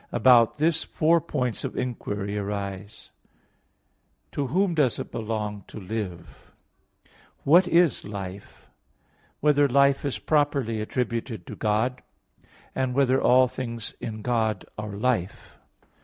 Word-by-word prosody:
About 120 -3 +5
this, 160 +2 +2
four 165 +1 +2
points 125 -8 -2
of - - -5
inquiry 105 -5 -3
arise: 100 0 -5 1.2
(1) - - -43
To 140 -2 -2
whom 185 +6 +1
does 145 -7 +2
it - - -6
belong 105 -2 -4
to - - -9
live? 95 -3 -7 0.5
(2) - - -31 0.3
What 175 +6 +5
is 170 -5 +3
life? 100 -1 -8
(3) - - -29 0.7
Whether 145 -1 +4
life 140 +1 +3
is 140 -3 -2
properly 140 -7 0
attributed 115 -3 -3
to - - -8
God? 115 +4 0 0.7
(4) 130 0 0
Whether 130 0 +2
all 130 +1 +5
things 115 -3 -5
in 110 -2 -6
God 110 -4 0
are 105 -1 -6
life? 105 -3 -2
120 Hz, 130 wpm, -25 LUFS, 105-140 Hz, 1.2 s, About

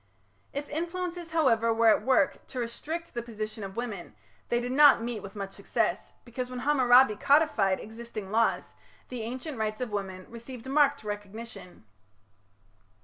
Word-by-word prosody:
If 285 +1 -4
influences, 345 +2 -3
however, 240 -9 +3
were 225 0 +4
at 215 - +4
work 275 +3 +2
to 255 - -6
restrict 315 +8 -5
the 240 - -2
position 215 -2 -6
of 195 0 -7
women 220 -7 -5 0.3
they 240 - +2
did 245 +1 -3
not 285 -3 +7
meet 235 -2 -3
with 195 +1 -10
much 195 -1 -5
success, - - -1
because 250 +1 -5
when 250 -1 -5
Hammurabi 255 -5 +5
codified 275 -8 +3
existing 220 -2 -8
laws, 225 +1 +1 0.4
the 250 -2 -5
ancient 255 +4 -5
rights 215 0 -2
of 250 -3 -3
women 190 -2 -4
received 235 +1 -10
marked 285 0 +3
recognition. 205 - -8
235 Hz, 150 wpm, -28 LUFS, 215-275 Hz, 0.4 s, not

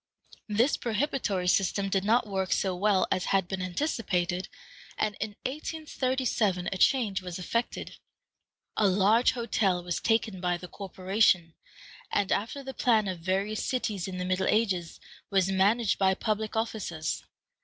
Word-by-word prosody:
This 230 +7 +2
prohibitory 230 -6 -1
system 195 +2 +2
did 195 -1 0
not 230 +4 +3
work 190 -3 -2
so 190 -2 0
well 195 0 +3
as 185 - +1
had 195 -2 +1
been 190 0 -3
anticipated, 185 - -1 0.5
and 215 -1 0
in 215 -2 -4
1837 260 - -1
a - - -3
change 215 -8 +3
was 180 -2 -6
effected. 230 +6 -3 0.8
A 210 - +3
large 205 +5 +4
hotel 200 -7 0
was 175 -1 -2
taken 225 -4 +1
by 180 -1 0
the 180 - -9
corporation, 185 -3 +1 0.6
and, 205 -1 +1
after 230 +7 -1
the 265 0 -6
plan 220 -6 +2
of 185 -2 -3
various 195 +5 -1
cities 210 -8 -2
in 185 -1 -5
the 180 - -2
Middle 185 +1 0
Ages, 190 -6 0 0.3
was 195 -1 +2
managed 200 +3 +2
by 190 -1 +3
public 215 +1 -2
officers. 210 -8 -2
195 Hz, 145 wpm, -28 LUFS, 185-225 Hz, 0.8 s, large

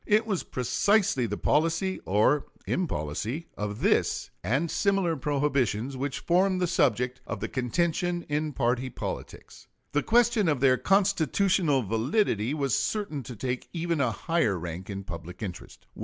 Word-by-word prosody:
It 215 +2 +4
was 200 -5 -1
precisely 135 - +1
the 105 0 -3
policy, 165 +5 +1
or 110 +9 +2 0.2
impolicy, 120 - -2
of 105 +1 -4
this - - +1
and 135 - 0
similar 195 -4 +1
prohibitions 135 -4 0
which 135 +1 -3
formed 185 +2 +2
the 180 - +2
subject 125 -6 +1
of - - -4
contention 170 +6 0
in 150 +1 -1
party 125 +1 0
politics. - - -7 0.2
The 145 - +2
question 230 -3 +3
of 145 -4 +1
their 130 -1 +4
constitutional 185 -5 +2
validity 115 - +1
was 140 -6 +1
certain 200 -10 -1
to 125 -1 -8
take 125 +3 -4
even 170 -2 -1
a 130 - +2
higher 115 - 0
rank 85 +3 -6
in 100 -1 -5
public 90 +3 -8
interest. 90 -4 -8
140 Hz, 140 wpm, -27 LUFS, 120-175 Hz, 0.2 s, It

